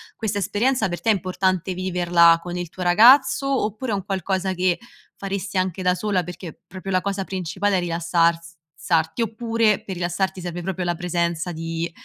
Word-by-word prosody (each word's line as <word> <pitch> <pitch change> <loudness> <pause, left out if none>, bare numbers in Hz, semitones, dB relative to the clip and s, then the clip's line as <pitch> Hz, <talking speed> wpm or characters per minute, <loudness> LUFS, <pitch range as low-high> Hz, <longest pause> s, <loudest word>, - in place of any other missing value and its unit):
questa 205 -2 -2
esperienza 225 +3 +1
per 175 -1 -5
te 225 - 0
è - - +6
importante 185 -1 -1
viverla 175 -2 +3
con 175 0 -6
il 175 -2 -4
tuo 185 - -6
ragazzo, 260 +7 +5
oppure 220 +3 -4
è - - +1
un 195 -1 -5
qualcosa 190 -1 -1
che 180 -1 +1 0.4
faresti 195 -1 -4
anche 185 0 -1
da 180 0 +3
sola? 195 -3 0
Perché 175 -1 -9
proprio 190 +1 -7
la 185 - +2
cosa 195 0 -2
principale 190 +2 -1
è - - +2
rilassars 170 0 0 0.3
sarti, 165 +5 0
oppure 225 -1 +1
per 190 - -6
rilassarti 180 +2 -2
serve 175 0 -5
proprio 185 0 -3
la 175 0 0
presenza 170 0 -2
di 165 +1 -4
185 Hz, 180 wpm, -22 LUFS, 175-200 Hz, 0.4 s, è